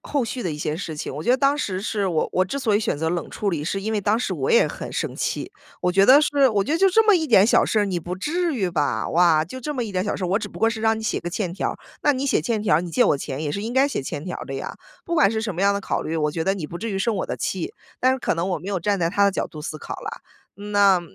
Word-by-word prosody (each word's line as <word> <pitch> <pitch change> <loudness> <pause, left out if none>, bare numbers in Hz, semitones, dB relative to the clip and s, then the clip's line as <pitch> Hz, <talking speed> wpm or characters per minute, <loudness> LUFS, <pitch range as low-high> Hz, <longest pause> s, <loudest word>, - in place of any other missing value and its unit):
后 280 -4 -1
续 245 +2 -4
的 175 - -2
一 150 - -4
些 150 +1 -2
事 160 -4 -5
情。 150 - -5
我 150 - -5
觉 245 - +1
得 255 - +5
当 275 +1 +2
时 190 -9 -2
是 205 -3 -1
我 165 -4 0
我 185 - +2
之 275 +9 -4
所 220 -6 +1
以 210 - +3
选 145 - -1
择 160 +1 0
冷 175 -1 -3
处 205 - -2
理， 155 -5 -2
是 195 +5 -2
因 220 +1 -2
为 210 - 0
当 210 +3 +1
时 - - -2
我 - - -2
也 470 +1 +5
很 - - -6
生 - - -2
气。 - - -3 0.3
我 180 - +2
觉 195 +1 +5
得 275 +3 +8
是， 280 -2 +3
我 205 -3 +1
觉 290 - -2
得： 325 - +1
“就 390 +2 +5
这 440 +4 +3
么 420 - +7
一 325 -3 +1
点 215 -6 +6
小 - - +4
事 220 - 0
儿， - - +2
你 185 -3 -2
不 180 +3 -5
至 335 - -1
于 190 -7 -1
吧。 145 -9 0
哇， 165 -2 +4
就 260 +10 -9
这 295 +4 -4
么 245 -3 -1
一 205 - -6
点 185 - 0
小 205 - -2
事 185 - -3
儿， - - 0
我 195 +3 +2
只 - - -5
不 - - -11
过 225 - +3
是 225 -1 -5
让 220 0 +2
你 - - -7
写 220 - -1
个 175 - -4
欠 185 -2 -2
条 190 - -2
儿， - - -7 0.3
那 290 - +4
你 265 +1 -2
写 - - +2
欠 225 -4 -1
条 195 - +3
儿， 160 - +2
你 175 - -6
借 160 - +3
我 - - +3
钱 135 +2 -5
也 145 - -2
是 200 - -3
应 230 +2 -4
该 270 +2 +5
写 280 - -3
欠 145 +2 -5
条 180 - -4
儿 - - -7
的 135 - -5
呀。 135 - -5 0.3
不 340 - -2
管 300 -11 +4
是 220 0 -2
什 205 -6 -3
么 180 - -4
样 200 0 +3
的 200 - -2
考 - - -1
虑， 165 +1 -3
我 150 -1 +1
觉 160 +1 -3
得 195 +3 +1
你 165 -6 -5
不 170 - -7
至 225 +3 -4
于 195 - -2
生 230 +3 0
我 - - -2
的 - - -3
气。” 185 -3 -3 0.3
但 255 +1 +4
是 260 - -2
可 - - 0
能 170 +3 -2
我 180 - -1
没 180 +6 -8
有 195 -3 -1
站 200 +1 0
在 165 -1 +1
他 200 +1 +3
的 200 - +4
角 - - -2
度 155 - -10
思 155 0 -5
考 - - -7
啦， - - -7 0.3
那 200 -2 +3
200 Hz, 370 characters per minute, -23 LUFS, 175-235 Hz, 0.3 s, 得